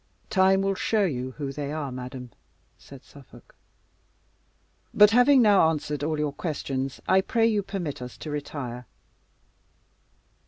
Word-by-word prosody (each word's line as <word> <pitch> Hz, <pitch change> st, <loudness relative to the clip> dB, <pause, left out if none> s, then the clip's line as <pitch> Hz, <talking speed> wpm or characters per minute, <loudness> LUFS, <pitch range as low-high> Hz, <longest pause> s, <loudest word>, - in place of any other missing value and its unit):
"Time 190 Hz, -1 st, +3 dB
will 195 Hz, 0 st, +1 dB
show 210 Hz, +2 st, +1 dB
you 130 Hz, -6 st, -3 dB
who 140 Hz, -1 st, -5 dB
they 145 Hz, 0 st, -5 dB
are, 150 Hz, -3 st, -4 dB
madam," 125 Hz, 0 st, -8 dB, 0.4 s
said 135 Hz, -2 st, -15 dB
Suffolk. 140 Hz, -3 st, -17 dB, 1.4 s
"But 210 Hz, 0 st, +7 dB
having 250 Hz, +2 st, +5 dB
now 200 Hz, -6 st, +5 dB
answered 150 Hz, -2 st, -3 dB
all 155 Hz, +1 st, -1 dB
your 150 Hz, -1 st, -2 dB
questions, 135 Hz, -4 st, -4 dB
I 190 Hz, -, +4 dB
pray 225 Hz, +3 st, +1 dB
you 215 Hz, -3 st, +2 dB
permit 185 Hz, -9 st, -5 dB
us 125 Hz, 0 st, -8 dB
to 155 Hz, -, -7 dB
retire." 130 Hz, -4 st, -6 dB
150 Hz, 135 wpm, -26 LUFS, 135-195 Hz, 1.4 s, But